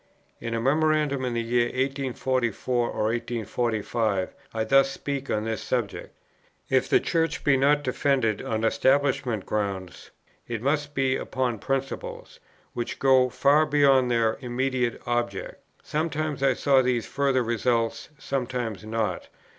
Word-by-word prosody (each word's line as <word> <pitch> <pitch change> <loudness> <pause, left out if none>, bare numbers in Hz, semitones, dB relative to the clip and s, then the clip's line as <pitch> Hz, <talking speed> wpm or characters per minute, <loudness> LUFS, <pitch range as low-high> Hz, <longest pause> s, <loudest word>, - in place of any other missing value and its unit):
In 115 0 -3
a - - 0
memorandum 150 +1 +2
of 120 -1 -2
the 115 - 0
year 120 +1 +2
1844 130 -2 -1
or - - -2
1845, 110 -2 -1 0.2
I 110 -1 -1
thus 135 +3 +4
speak 140 0 -4
on 105 0 0
this 110 -1 -2
subject: 120 -6 -3 0.6
"If 130 -1 +2
the - - +5
Church 165 -1 -1
be 145 - +4
not 145 +2 +3
defended 130 -5 +1
on 110 0 -2
establishment 130 -2 +1
grounds, 100 -4 -3 0.4
it 115 -2 -4
must 145 +1 0
be 135 -1 +2
upon 125 -4 -2
principles, 135 +4 -4 0.3
which 120 - -4
go 130 -1 +4
far 150 +5 +3
beyond 140 -4 +4
their 115 -2 +1
immediate 125 -1 -1
object. 120 0 -3 0.2
Sometimes 155 -2 -2
I 135 - +3
saw 135 -2 +4
these 125 -2 0
further 135 -2 +1
results, 115 0 0
sometimes 125 -6 -3
not. 110 0 -2
125 Hz, 135 wpm, -26 LUFS, 115-135 Hz, 0.6 s, the